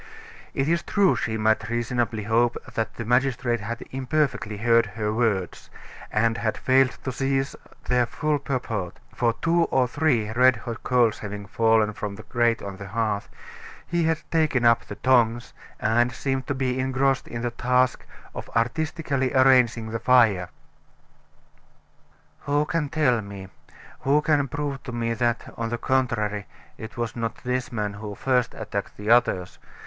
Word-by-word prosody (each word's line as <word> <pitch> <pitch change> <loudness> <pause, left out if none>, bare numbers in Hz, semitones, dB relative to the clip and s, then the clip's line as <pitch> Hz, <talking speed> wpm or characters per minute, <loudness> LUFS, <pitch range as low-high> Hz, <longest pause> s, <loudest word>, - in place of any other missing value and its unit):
It 135 - 0
is 170 +1 +2
true 195 0 +2
she 110 0 -2
might 110 0 +1
reasonably 120 -2 -1
hope, 115 +3 +2 0.2
that 115 -1 -2
the 115 - -5
magistrate 125 0 +1
had 115 +3 -5
imperfectly 130 -5 -1
heard 115 +1 +3
her 105 0 -3
words, 110 -6 -1 0.4
and 115 +1 +1
had 110 -1 -1
failed 130 0 +3
to 130 - -2
seize 135 +1 -1 0.3
their 125 -1 +2
full 150 +4 -1
purport, 115 -9 -3 0.2
for 115 -2 +1
two 170 0 +3
or 130 -1 +2
three 125 -6 +1
red 125 +3 +5
hot 115 0 -7
coals 120 -3 +2
having 105 -1 -6
fallen 110 0 +2
from 105 -1 -5
the 110 - -11
grate 120 -1 +1
on 100 -1 -6
the 100 - -8
hearth, 105 0 -2 0.6
he 170 -1 0
had 160 0 +2
taken 155 -7 +2
up 115 0 +4
the - - -7
tongs, 120 -2 +2 0.3
and 120 +2 +2
seemed 135 +1 -3
to 145 - -1
be 130 -1 -1
engrossed 130 0 +1
in 115 0 -5
the 120 - -1
task 125 +2 +1 0.3
of - - -7
artistically 140 +2 0
arranging 125 -4 +4
the 115 - -2
fire. 110 -7 +4 2.0
"Who 145 +1 +2
can 150 -1 -1
tell 130 -7 +2
me 100 -2 -9 0.5
who 140 +3 +2
can 145 -3 +2
prove 140 0 -4
to 125 - -7
me 115 -1 -1
that, 120 0 -1
on 115 0 -2
the 120 - -2
contrary, 115 -5 0 0.3
it 110 +2 -9
was 120 -1 -3
not 115 -1 -4
this 125 0 -2
man 105 -3 -2
who 105 0 -7
first 125 0 0
attacked - - -5
the 105 +2 -1
others?" 95 -7 +2
120 Hz, 160 wpm, -25 LUFS, 110-130 Hz, 2.0 s, red